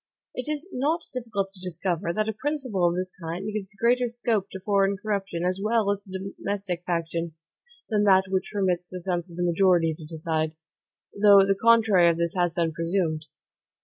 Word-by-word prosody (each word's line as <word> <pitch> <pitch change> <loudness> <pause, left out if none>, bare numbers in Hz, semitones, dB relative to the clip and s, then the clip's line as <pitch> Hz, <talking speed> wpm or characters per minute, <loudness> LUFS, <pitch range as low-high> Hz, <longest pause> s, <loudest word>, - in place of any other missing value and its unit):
It 250 +4 -3
is 305 +4 -2
not 310 +6 0
difficult 215 -6 -3
to 195 - -13
discover, 175 -1 -2
that 215 +4 -1
a 220 - -1
principle 245 - 0
of 170 - -2
this 185 0 -3
kind 175 +6 -4
gives 200 -2 -3
greater 245 +4 +2
scope 230 -4 -1
to 190 - -7
foreign 195 0 +1
corruption, 195 -4 -2
as 185 +2 0
well 215 -1 +2
as 200 0 -3
to 190 0 -6
domestic 195 -3 -3
faction, 170 -1 -2 0.5
than 210 -2 +1
that 190 -1 +6
which 190 0 -1
permits 185 -4 0
the 185 - -6
sense 175 -1 -2
of 170 - -11
the 175 - -2
majority 175 -2 +3
to 155 +1 -10
decide; 160 0 -2 0.6
though 200 -1 +6
the 195 0 +2
contrary 220 -6 +5
of 165 - 0
this 170 0 -1
has 175 -2 +1
been 170 -1 0
presumed. 165 -1 -1
190 Hz, 185 wpm, -26 LUFS, 170-210 Hz, 0.6 s, that